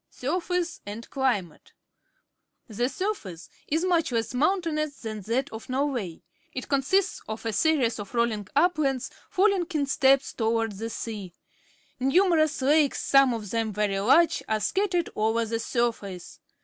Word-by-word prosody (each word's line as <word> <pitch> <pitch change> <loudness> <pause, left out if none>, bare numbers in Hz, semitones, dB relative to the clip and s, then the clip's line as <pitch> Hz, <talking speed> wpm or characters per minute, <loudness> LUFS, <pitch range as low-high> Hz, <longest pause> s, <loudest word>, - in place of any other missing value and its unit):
Surface 345 +4 -2
and 210 +3 -7
Climate.— 220 - -2 0.9
The 240 +2 -1
surface 270 - -4 0.2
is 320 +4 0
much 340 -6 +1
less 230 0 -1
mountainous 305 0 0
than 215 -2 -5
that 260 +5 0
of 220 +2 -9
Norway. 255 - -2 0.3
It 255 - -5
consists 350 +8 +1
of 220 +1 -6
a 225 - -1
series 270 -6 +2
of 205 +3 -8
rolling 225 -4 0
uplands, 290 -5 +1 0.2
falling 385 -2 +2
in 290 -2 +2
steps 275 -1 +3
toward 225 -1 0
the 220 +3 -5
sea. 205 -6 -6 0.6
Numerous 310 +1 +3
lakes, 295 +1 +3
some 275 -2 +4
of 210 -4 -6
them 225 -2 -1
very 200 -1 0
large, 275 +11 +4
are 220 -1 +1
scattered 355 - 0
over 225 +2 +1
the 225 +1 -2
surface. 225 -7 -3
255 Hz, 140 wpm, -26 LUFS, 220-310 Hz, 0.9 s, some